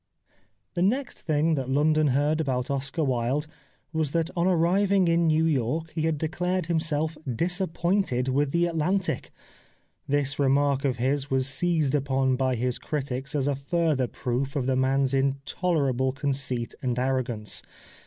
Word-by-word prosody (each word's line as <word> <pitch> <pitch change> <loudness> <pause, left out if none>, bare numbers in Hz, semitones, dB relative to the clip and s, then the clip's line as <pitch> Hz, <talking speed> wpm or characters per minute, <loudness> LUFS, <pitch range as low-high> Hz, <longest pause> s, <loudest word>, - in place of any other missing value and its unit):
The 175 - -2
next 245 +8 0
thing 155 +1 +1
that 135 -4 -2
London 155 +2 +3
heard 145 +4 +2
about 130 -2 -1
Oscar 140 +4 -2
Wilde 130 +2 0 0.5
was 155 -3 -1
that 165 0 0
on 175 +1 +2
arriving 185 +2 +3
in 170 0 +3
New 160 +1 +3
York 155 +2 0
he 160 0 0
had 160 -2 0
declared 180 +3 -1
himself 160 -1 -1
disappointed 175 - 0
with 140 +2 +1
the 170 +4 +2
Atlantic. 175 +3 -1 0.8
This 145 0 0
remark 140 0 +2
of 130 -2 0
his 135 +3 0
was 130 -1 +1
seized 155 +1 +1
upon 135 -2 +1
by 130 0 +1
his 125 +1 -1
critics 135 -2 -3
as 140 -2 +1
a 145 - +2
further 140 -1 0
proof 130 +4 -3
of 135 -3 0
the 130 0 +1
man's 135 +1 +2
intolerable 135 -1 0
conceit 135 -4 -2
and 125 -1 -1
arrogance. 125 -5 -1
145 Hz, 150 wpm, -26 LUFS, 130-165 Hz, 0.8 s, London